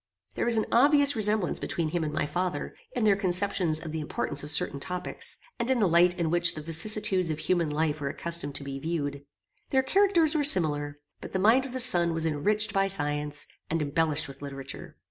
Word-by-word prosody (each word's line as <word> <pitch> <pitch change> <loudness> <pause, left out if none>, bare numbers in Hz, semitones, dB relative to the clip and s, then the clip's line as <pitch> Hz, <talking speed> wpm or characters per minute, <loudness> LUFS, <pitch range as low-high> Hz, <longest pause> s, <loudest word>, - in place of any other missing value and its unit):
There - - -3
was 235 -1 +2
an 220 - 0
obvious 285 +3 +5
resemblance 210 -3 +1
between 165 -2 -3
him 170 +1 -2
and 150 - -3
my 150 - -2
father, 175 -1 -4 0.2
in 245 - -2
their 205 -2 +4
conceptions 185 -4 +1
of 160 -1 -8
the 160 - -4
importance 145 -1 -2
of 145 - -7
certain 140 -1 +1
topics, 180 +5 -4 0.2
and 235 +1 -2
in 260 -2 +1
the 210 - +2
light 175 +1 +3
in 165 -2 -2
which 175 0 +3
the 155 - -6
vicissitudes 185 +2 +1
of 155 - -3
human 170 -1 -1
life 150 0 -2
were 140 - -3
accustomed 170 -3 -2
to - - -5
be 135 0 -7
viewed. 145 -2 -4 0.5
Their 265 -1 +1
characters 355 -1 +2
were 305 -2 0
similar, 145 - +4 0.2
but - - -11
the - - 0
mind 230 +8 +3
of 255 - -11
the 260 - -3
son 175 -9 +4
was 165 0 -1
enriched 205 +8 0
by 195 0 +1
science, 150 -4 -1 0.2
and 165 - -1
embellished 155 0 0
with 135 - -13
literature. 135 -1 -9
170 Hz, 210 wpm, -26 LUFS, 150-210 Hz, 0.5 s, obvious